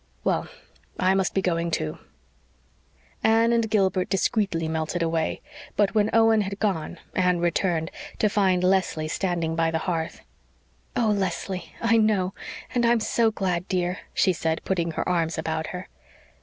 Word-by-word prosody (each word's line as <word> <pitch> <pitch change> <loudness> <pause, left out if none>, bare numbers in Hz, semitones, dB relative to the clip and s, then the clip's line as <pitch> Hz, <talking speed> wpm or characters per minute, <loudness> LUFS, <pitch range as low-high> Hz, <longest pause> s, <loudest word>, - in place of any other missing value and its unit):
Well, - - 0 0.5
I 185 +1 +3
must 190 -1 0
be 195 - +1
going, 170 -1 0
too." 80 - -2 1.2
Anne 225 +1 +4
and 230 -2 +1
Gilbert 190 -3 +1
discreetly 195 -4 0
melted 160 +2 -1
away; 165 -1 -1 0.3
but 205 -2 +2
when 215 -1 +3
Owen 225 -1 +5
had 200 0 -3
gone 180 -6 -1 0.2
Anne 180 -1 +2
returned, 170 -1 0 0.3
to 215 - +3
find 190 -4 +2
Leslie 185 -4 +1
standing 170 -1 -1
by 165 0 +2
the 165 - 0
hearth. 165 -3 -2 0.7
"Oh, 230 -3 +2
Leslie 190 -1 -3
I 230 0 +4
know 205 -4 +2 0.4
and 245 - +1
I'm 235 0 +4
so 225 +1 +2
glad, 185 -4 -2
dear," 180 -1 -1
she 185 - +2
said, 160 -1 -1
putting 170 -3 0
her - - -2
arms 170 -2 0
about 160 -1 -2
her. 180 0 -6
185 Hz, 155 wpm, -25 LUFS, 165-205 Hz, 1.2 s, Owen